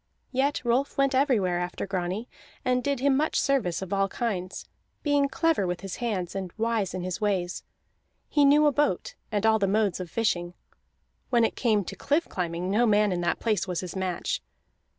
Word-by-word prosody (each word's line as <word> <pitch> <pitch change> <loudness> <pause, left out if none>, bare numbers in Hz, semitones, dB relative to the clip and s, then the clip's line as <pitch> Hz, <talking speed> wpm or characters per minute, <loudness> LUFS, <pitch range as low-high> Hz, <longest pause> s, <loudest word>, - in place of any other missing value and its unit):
Yet 270 0 0
Rolf 250 +4 +1
went 275 0 +3
everywhere 225 -10 +2
after 180 +2 -3
Grani, 190 +3 -3 0.4
and 250 0 +2
did 280 -2 -1
him 275 0 +3
much 305 +3 +1
service 215 -11 +1
of 190 +1 -5
all 195 0 +2
kinds, 195 -4 -3 0.4
being 285 -2 +2
clever 320 - +1
with 180 0 -3
his 195 -1 -6
hands 200 -8 -2
and 190 -2 -4
wise 225 -4 0
in 185 - -3
his 185 +3 -4
ways; 185 -4 0 0.7
he 290 - +3
knew 290 +2 +6
a 295 - +5
boat 295 - 0 0.2
and 210 0 0
all 220 0 +4
the 200 - +2
modes 200 -2 +1
of 180 -2 -5
fishing; 175 -4 -1 0.7
when 235 -2 +4
it - - -2
came 215 -4 +2
to - - -6
cliff 305 +4 0
climbing, 175 0 -3
no 235 +4 +3
man 210 -1 +3
in 175 -1 -1
that 170 - 0
place 210 -4 0
was 180 -2 -2
his 180 -1 -7
match. 185 -2 -2
210 Hz, 190 wpm, -27 LUFS, 185-260 Hz, 0.7 s, knew